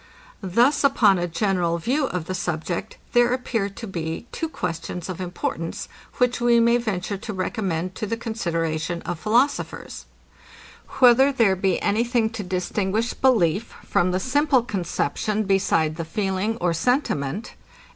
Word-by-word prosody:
Thus 235 - +3
upon 220 -9 +4
a 175 - -1
general 175 -2 0
view 265 - 0
of 180 -3 -3
the 185 - -4
subject, 170 -1 -3 0.2
there 240 0 +4
appear 230 -5 -1
to 200 +4 -8
be 165 -1 -4
two 325 - -3
questions 175 - -4
of 185 0 -5
importance, 180 +1 -4 0.3
which 250 -1 +1
we 240 -1 +5
may 235 +1 +4
venture 200 -4 -2
to 220 +3 -6
recommend 185 -3 -2
to 215 - -4
the 230 - -2
consideration 170 -7 -2
of 170 - -4
philosophers, 240 +8 0 0.9
Whether 260 +2 +6
there 230 -8 +3
be 190 0 +1
any 215 +3 +2
thing 235 -2 +1
to 225 -2 -5
distinguish 190 +4 -1
belief 215 -6 +2
from 175 - +2
the 180 +1 0
simple 265 +3 +2
conception 210 0 -1
beside 165 -6 +1
the 165 - -2
feeling 195 +4 -1
of 175 -5 0
sentiment? 210 - -1
200 Hz, 145 wpm, -23 LUFS, 175-235 Hz, 0.9 s, Whether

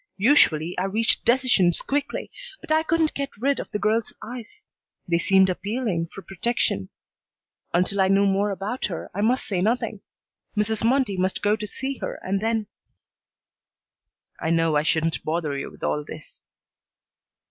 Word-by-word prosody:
Usually 180 - +4
I 185 - 0
reached 220 +4 +2
decisions 235 -8 +4
quickly, 285 +1 -2 0.3
but 335 - -9
I 315 0 +4
couldn't 320 -1 +1
get 280 -1 -3
rid 275 +5 +1
of - - -6
the - - -2
girl's 215 +2 0
eyes. 240 0 -9 0.4
They 170 -1 +2
seemed 190 +1 +4
appealing 195 -2 -2
for 195 - -11
protection. 195 - -1 0.8
Until 185 +3 +1
I 190 - +4
knew 195 +1 +4
more 200 +1 +2
about 205 +6 -3
her 175 -5 -5
I 205 - -2
must 245 +5 +2
say 185 -4 -1
nothing. 230 +6 0 0.6
Mrs. 210 +1 +1
Mundy 235 -4 +2
must 185 +1 -1
go 205 +1 +3
to 215 -1 -5
see 270 +5 -4
her - - -4
and 195 +1 0
then 225 0 0 1.7
"I 160 - -2
know 165 -1 +2
I 150 - +4
shouldn't 160 +1 0
bother 155 -2 -1
you 140 - -4
with - - -16
all 150 - 0
this." 155 +1 -11
200 Hz, 160 wpm, -24 LUFS, 175-240 Hz, 1.7 s, Usually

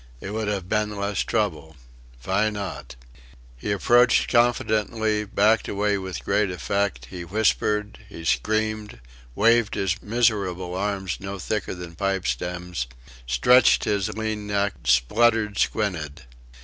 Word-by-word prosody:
It 100 - -7
would 110 -1 -2
'ave 100 -4 -2
been 105 +2 -1
less 100 -1 -2
trouble. 85 -8 -1 0.5
Vy 100 - +1
not?" 100 -12 -6 0.6
He - - -4
advanced 120 +4 +4
confidentially, 110 -2 +1
backed 105 +2 +2
away 100 0 0
with 90 -10 -6
great 105 -2 +1
effect; 90 -7 -2
he 90 -2 -6
whispered, 105 +2 0
he 80 - -9
screamed, 110 - -1 0.4
waved 115 0 +3
his 95 +1 -1
miserable 100 -6 0
arms 95 -1 -2
no 100 0 -6
thicker 100 +1 -3
than 90 -1 -8
pipe 100 +1 -1
stems 90 +2 -3 0.4
stretched 125 - +5
his 100 -2 0
lean 110 -1 -3
neck 100 -1 0
spluttered 105 - +3
squinted. 85 -8 -1
100 Hz, 125 wpm, -24 LUFS, 90-110 Hz, 0.6 s, stretched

